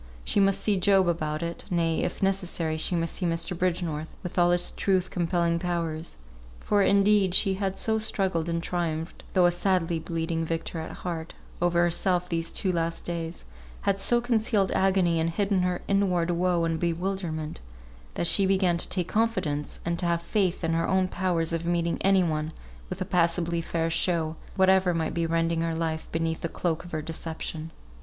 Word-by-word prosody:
She - - 0
must 195 -1 +3
see 205 -2 +2
Job 190 0 +4
about 155 -2 -1
it; 170 0 -4
nay, 165 -2 +1
if - - -3
necessary, 180 -4 0
she 160 +3 0
must 165 -1 -1
see 180 - -2
Mr. 165 +2 -2
Bridgenorth, 170 -3 -1 0.2
with 180 - -6
all 175 0 +5
his 175 0 +1
truth 185 -2 0
compelling 170 -1 0
powers; 170 -2 -3 0.4
for, 205 -1 +1
indeed, 200 -1 +4
she 195 - +4
had 195 0 -2
so 220 0 +1
struggled 190 -6 0
and 165 0 -1
triumphed 165 -2 -3
(though 180 -1 +5
a 175 - +5
sadly 175 -2 +1
bleeding 165 0 -2
victor 165 +1 -3
at 160 - -5
heart) 165 -2 -6 0.3
over 175 0 +3
herself 180 +1 +1
these 165 -1 -1
two 190 - 0
last 165 -1 -2
days, 170 -1 -4 0.4
had 195 0 +1
so 240 +4 +4
concealed 220 -4 +1
agony, 185 -3 +2
and 165 +1 +1
hidden 195 +2 +1
her 180 -1 -1
inward 180 -4 +1
woe 175 0 +1
and 165 -1 -1
bewilderment, 170 - -3 0.5
that - - -1
she 195 +3 +5
began 190 -3 +2
to - - -1
take 180 -2 0
confidence, 195 -11 -1
and 170 0 -1
to 175 - 0
have 170 0 0
faith 185 -2 0
in 165 0 +1
her 165 0 +1
own 190 -1 +2
powers 175 -3 -1
of 165 0 -2
meeting 170 -1 0
any 195 -1 +4
one 155 -2 -1 0.4
with - - -6
a - - 0
passably 170 -1 +1
fair 165 0 -1
show, 165 -1 +1 0.2
whatever 190 -2 +4
might 160 -1 -1
be 170 0 0
rending 165 0 0
her 165 0 -1
life 160 -1 -2
beneath 165 0 -1
the 170 - -2
cloak 165 -1 -2
of 175 - -12
her 155 -1 -3
deception. 160 0 -5
170 Hz, 185 wpm, -27 LUFS, 165-190 Hz, 0.5 s, all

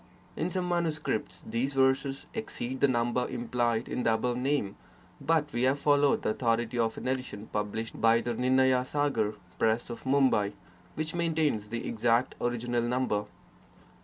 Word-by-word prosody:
In 165 - -1
some 185 -1 -2
manuscripts, 160 -9 -2
these 135 +4 -2
verses 135 +1 +2
exceed 130 - -4
the 140 - +5
number 120 0 +1
implied 120 -1 -1
in 125 - -2
the 115 -2 +3
above 120 +2 -1
name, 125 -6 0 0.5
but 155 -2 +1
we 120 - -1
have 130 +2 +3
followed 145 -1 +3
the - - +1
authority 120 +1 0
of 115 -1 0
an - - -5
edition 125 -5 -3
published 105 +2 -3
by 115 0 +5
the 120 - -2
Nirnaya 130 +1 +3
sagar 130 -7 0 0.2
Press 115 +2 +1
of 120 - -7
Mumbai, 130 -7 +3 0.4
which 155 0 -3
maintains 155 -11 0
the 115 +1 -4
exact 115 +2 +1
original 120 0 0
number. 120 -3 0
125 Hz, 155 wpm, -29 LUFS, 115-140 Hz, 0.5 s, the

